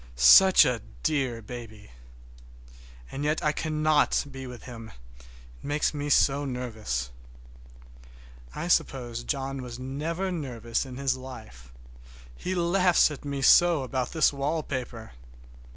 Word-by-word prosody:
Such 150 - +7
a 125 -4 -1 0.2
dear 130 -6 -1
baby! 110 - -10 1.2
And 140 - -5
yet 150 +1 -1
I 150 - +2
cannot 155 -1 +1
be 135 -1 -8
with 125 -1 -10
him, 115 -3 -10 0.3
it - - -18 0.4
makes 145 +2 -1
me 145 0 -4
so 140 0 +3
nervous. 110 - -4 1.4
I 170 - -4
suppose 125 -8 0
John 135 +1 -3
never 130 - -6
was 120 -1 -8
nervous 140 - -3
in 125 -1 -9
his 135 -1 0
life. 60 - -11 0.6
He 185 - -4
laughs 175 -1 +3
at 150 - -9
me 140 -1 -4
so 170 -3 +5
about 130 -1 -3
this 160 -2 +2
wallpaper! 135 -5 -4
135 Hz, 125 wpm, -27 LUFS, 120-150 Hz, 1.4 s, Such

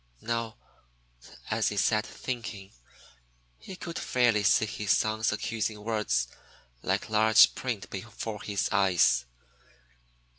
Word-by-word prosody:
Now 115 0 -3 0.9
as 110 0 +1
he 105 - -5
sat 110 +1 +2
thinking, 115 -6 -6 0.9
he 190 - -9
could 170 -2 -6
fairly 120 -4 +2
see 100 +2 +4
his 105 -1 -5
son's 110 +1 +2
accusing 110 -2 -3
words 105 - 0 0.5
like - - -1
large 110 0 +6
print 115 -6 -4
before 105 +1 -6
his 100 -1 -1
eyes. 90 -11 +3
110 Hz, 110 wpm, -28 LUFS, 105-115 Hz, 0.9 s, large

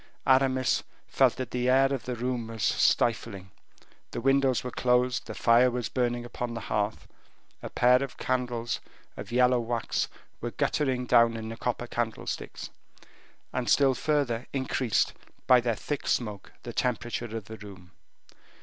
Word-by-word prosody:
Aramis 130 -1 +3 0.2
felt - - +3
that 130 -3 -5
the 125 0 0
air 135 +1 +4
of 130 -6 -4
the 125 - -3
room 120 -1 -2
was 115 -1 -5
stifling; 105 -5 +1 0.6
the - - -5
windows 135 0 +2
were 125 - -4
closed; 125 0 +1
the 110 - -6
fire 120 +2 +5
was 120 -2 -3
burning 120 -1 -1
upon 120 0 -5
the - - -3
hearth; 105 +1 -2 0.5
a - - -6
pair 125 +1 +4
of 135 -2 -5
candles 120 -2 -1 0.4
of - - -8
yellow 125 0 +4
wax 115 -1 -1 0.3
were - - -3
guttering 130 -4 0
down 115 -2 +4
in 110 0 -6
the 115 - -5
copper 120 0 -2
candlesticks, 120 -2 -4 0.8
and 125 -1 -1
still 135 -2 +5
further 135 -5 0
increased, 130 -4 0 0.3
by 125 -1 +6
their 120 -2 0
thick 145 +6 -4
smoke, 105 -5 -2
the 120 - -7
temperature 120 -2 -2
of 110 - -7
the 110 +1 -9
room. 95 -4 -12
120 Hz, 155 wpm, -28 LUFS, 115-130 Hz, 0.8 s, by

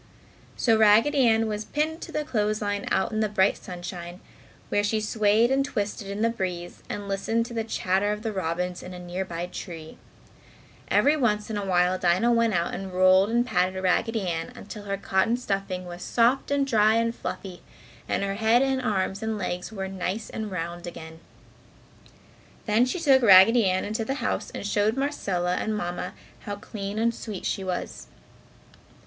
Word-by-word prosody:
So 225 -3 +3
Raggedy 230 +6 +5
Ann 225 0 +3
was 215 -1 -3
pinned 310 +6 -2
to 335 - -7
the 300 - -1
clothes 215 -6 0
line, 205 -1 -2
out 190 - +1
in 215 - -1
the 215 -1 +1
bright 200 -1 +3
sunshine, 175 0 -8 0.5
where 205 - +1
she 215 +1 +1
swayed 215 +2 +2
and 270 +1 +3
twisted 210 -6 -3
in 200 +2 -3
the 230 - +4
breeze 180 -5 -5
and 205 -1 -5
listened 210 +4 0
to 240 - -9
the 225 -1 -1
chatter 200 -2 0
of 210 +1 -4
the 220 -2 -2
robins 180 -1 -2
in 180 0 -8
a - - -7
nearby 175 -1 -4
tree. 165 -3 -9 0.9
Every 290 +2 +4
once 215 -6 0
in - - -2
a 205 - -2
while 180 -1 +2
Dinah 185 +7 +3
went 230 -3 +2
out 170 0 0
and 195 -1 -5
rolled 185 +2 +5
and 240 +1 +2
patted 185 -5 0
Raggedy 195 +3 0
until 175 +5 -5
her 200 0 -2
cotton 195 +4 +1
stuffing 195 -5 -3
was 175 0 -8
soft 240 +6 +2
and 285 -1 +2
dry 220 -4 +4
and 230 0 +1
fluffy 185 -5 -6 0.5
and - - 0
her 195 0 -1
head 225 +4 +3
and 265 -1 0
arms 195 -3 -1
and 220 -1 -2
legs 180 0 -4
were 195 -3 -4
nice 190 +3 -4
and 220 -1 -4
round 175 -1 -5
again. 160 -1 -9 1.5
Then 225 +3 +3
she 255 - -2
took 275 -5 +5
Raggedy 220 +2 +7
Ann 185 0 0
into 215 +2 -2
the 270 +5 -2
house - - -2
and - - -7
showed 210 +3 +1
Marcella 190 -11 -1
and 215 -1 -1
Mamma 175 -2 -4 0.3
how 205 -2 -5
clean 200 0 -6
and 230 +1 +2
sweet 215 -4 -7
she 195 - -1
was. 185 -1 -4
205 Hz, 180 wpm, -26 LUFS, 185-225 Hz, 1.5 s, Raggedy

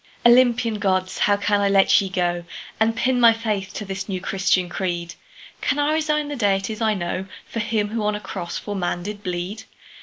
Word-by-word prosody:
Olympian 240 -2 +4
Gods! 185 -2 0
how 205 0 +3
can 205 0 +1
I 200 - +2
let 195 0 +5
ye 195 - -3
go 175 -2 -1 0.4
And 225 +1 +2
pin 250 +2 +1
my 230 -1 +7
faith 210 -4 -3
to 210 - -4
this 195 +1 -5
new 185 -2 -2
Christian 185 -1 +1
creed? 175 -2 -3 0.5
Can 280 - 0
I 290 +1 +2
resign 305 -1 0
the 290 - -4
deities 205 -1 0
I 220 -1 +2
know 185 +1 -3 0.2
For 230 - -5
him 215 -1 0
who 225 +1 -2
on 210 0 +1
a - - -4
cross 190 -3 -5
for 205 - -5
man 175 -2 -2
did 205 +1 -6
bleed? 180 +2 -4
205 Hz, 205 wpm, -22 LUFS, 190-225 Hz, 0.5 s, my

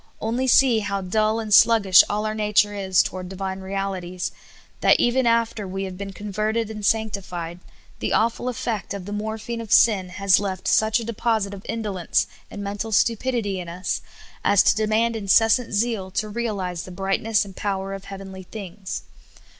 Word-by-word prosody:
Only 240 +4 -1
see 250 -2 +5
how 200 -2 -2
dull 215 +4 +1
and 215 -2 -2
sluggish 215 -4 +7
all 210 +1 -1
our 215 - -1
nature 210 -1 +2
is 190 -2 +2
toward 185 -1 -6
Divine 190 0 -4
realities; 190 -2 -4 0.5
that - - +4
even 240 +1 +2
after 230 -3 +1
we 195 +1 -4
have 190 -1 -5
been 195 +1 -6
converted 215 +3 -2
and 215 -1 -7
sanctified, 195 -6 -2 0.4
the - - -2
awful 235 +2 +1
effect 220 -4 -3
of 190 -2 -7
the 205 - -7
morphine 220 +2 -4
of 225 - -9
sin 195 -5 +5
has 195 +1 +3
left 190 -2 -4
such 220 +1 +3
a - - -5
de 230 - -4
posit 220 -3 0
of 195 0 -9
indolence 205 -6 0 0.2
and 205 - -7
mental 205 +2 -4
stupidity 225 -2 +1
in 175 -1 -6
us 180 +2 -3 0.4
as 200 - +5
to - - +4
de 215 0 0
mand 225 +2 +1
incessant 225 +3 +3
zeal 210 -3 0
to 200 +3 -2
realize 200 -6 -3
the - - -9
brightness 195 +3 0
and 195 -2 -12
power 195 -1 -3
of 195 0 -8
heavenly 190 -1 -8
things. 190 0 -7
205 Hz, 180 wpm, -23 LUFS, 190-225 Hz, 0.5 s, sluggish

